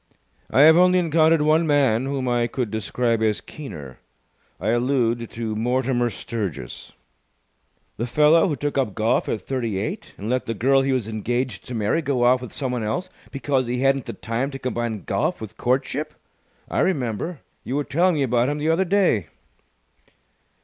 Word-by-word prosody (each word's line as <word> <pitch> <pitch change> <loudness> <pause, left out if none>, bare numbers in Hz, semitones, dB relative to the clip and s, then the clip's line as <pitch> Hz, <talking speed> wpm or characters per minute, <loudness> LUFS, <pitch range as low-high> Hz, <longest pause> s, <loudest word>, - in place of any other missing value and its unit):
"I 135 - +4
have 160 +2 +8
only 180 +1 +5
encountered 160 -2 +3
one 160 +2 +3
man 135 -5 +3
whom 135 -2 -2
I 120 -1 +1
could 120 -4 -3
describe 115 +2 -1
as 110 -1 +1
keener. 75 - -9 0.6
I 100 +6 -1
allude 120 -1 +1
to 115 -2 -4
Mortimer 120 +1 0
Sturgis." 100 - -6 1.0
"The 120 - -2
fellow 150 +7 +4
who 155 - -1
took 145 +1 -2
up 115 -7 -1
golf 110 +1 +1
at 105 - -2
thirty 115 -4 -2
eight 170 - -4
and 100 - -6
let 125 +2 -1
the 115 - -2
girl 135 +5 +3
he 135 0 0
was 125 -5 0
engaged 115 +1 -2
to 125 - -5
marry 110 +9 +1
go 140 -5 0
off 125 +1 +4
with 125 - -8
someone 125 -4 -2
else 140 +13 -2 0.2
because 135 0 -1
he 125 +1 -2
hadn't 135 -1 +2
the - - -4
time 115 +5 -3
to 135 - -6
combine 120 -5 -3
golf - - -1
with 110 0 -8
courtship? 135 +6 -1 0.5
I - - -2
remember. 140 - -1 0.2
You 130 - -3
were 145 - 0
telling 170 +6 +2
me 145 - +1
about 125 0 +2
him 145 - -2
the 150 +2 -1
other 170 +4 +2
day." 180 - +2
125 Hz, 175 wpm, -23 LUFS, 115-145 Hz, 1.0 s, have